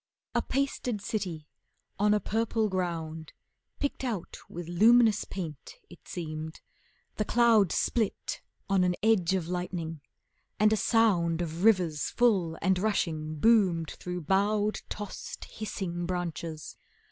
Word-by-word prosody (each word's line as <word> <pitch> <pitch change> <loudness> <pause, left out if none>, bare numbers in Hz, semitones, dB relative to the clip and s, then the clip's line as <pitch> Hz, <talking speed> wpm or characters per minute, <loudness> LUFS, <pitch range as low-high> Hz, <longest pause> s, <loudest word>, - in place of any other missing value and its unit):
A - - +2
pasted 265 -5 -1
city 190 -6 -3 0.5
on 210 +1 +4
a 210 - +4
purple 220 +1 0
ground, 165 -4 -3 0.5
Picked 285 -1 -2
out 220 -9 -3
with 175 -1 -7
luminous 220 +4 +5
paint, 165 - -7 0.2
it - - -15
seemed. 160 -2 -5 0.6
The 215 - +1
cloud 225 -5 +4
Split 225 -4 -1 0.3
on 195 -2 +3
an 180 -1 +2
edge 190 -5 +3
of 175 -4 -2
lightning, 175 -3 -4 0.6
and 215 +1 +5
a - - +4
sound 195 -8 +2
Of 170 +1 -3
rivers 180 -9 +3
full 195 -9 +2
and 190 -1 +3
rushing 160 -7 -1
boomed 180 -3 +3
through 180 0 -5
bowed, 205 +5 +1
Tossed, 205 -1 -6
hissing 175 -5 -4
branches. 170 -3 -4
185 Hz, 125 wpm, -29 LUFS, 165-215 Hz, 0.6 s, luminous